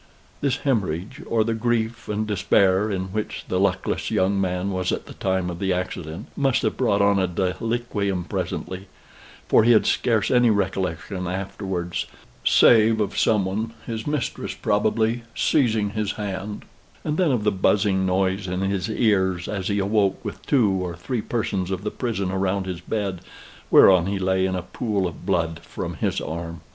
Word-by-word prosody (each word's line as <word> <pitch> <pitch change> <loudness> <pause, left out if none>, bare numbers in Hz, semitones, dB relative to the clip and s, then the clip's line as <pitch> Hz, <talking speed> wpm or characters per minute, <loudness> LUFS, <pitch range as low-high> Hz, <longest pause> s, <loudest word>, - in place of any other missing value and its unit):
This 140 -2 +1
hemorrhage, 110 - -1
or 115 -1 +2
the 115 +1 -1
grief 115 0 -1
and 105 +1 -1
despair 100 0 +2
in 95 -2 -3
which 105 0 -4
the - - +1
luckless - - 0
young 95 +1 +1
man 90 +1 -1
was 95 -1 -1
at - - -3
the - - -10
time 95 -1 -1
of 85 - -7
the 95 -1 0
accident, 90 +1 -4
must 135 -3 +1
have - - 0
brought 100 -6 +2
on 100 -1 +4
a 95 - +2
deliquium 100 +1 -1
presently; 95 +1 -4 0.6
for - - +5
he 120 +1 +6
had 110 - +4
scarce 110 -3 +1
any 125 -2 +5
recollection 95 -2 -1
afterwards, 95 -2 -3 0.4
save 110 -1 +5
of 105 - -1
some 105 -4 +3
one, 110 +4 -3
his 110 0 -5
mistress 145 -4 -2
probably, 110 +3 +1
seizing 110 -8 +2
his 105 -1 -2
hand 105 0 -5 0.4
and 150 0 -1
then 180 -5 +3
of 120 -5 0
the 105 - +3
buzzing 95 0 +2
noise 95 +1 0
in 90 +1 -2
his 95 0 -1
ears 95 -6 +1
as 95 -3 -3
he 100 - 0
awoke, 100 0 +1
with - - -6
two 125 -7 +4 0.2
or 85 -2 -4
three 115 +7 -3
persons 100 -5 -2
of 95 0 -3
the 105 - -2
prison 105 -7 -2
around 95 0 0
his 90 -2 -5
bed, 100 -2 -3 0.5
whereon 90 -2 +7
he 100 0 -1
lay 95 0 +1
in 95 - -2
a 90 - -3
pool 100 0 -2
of 90 +1 -6
blood 85 -4 0
from 85 - -6
his - - -1
arm. 85 +1 -5
100 Hz, 175 wpm, -23 LUFS, 95-110 Hz, 0.6 s, whereon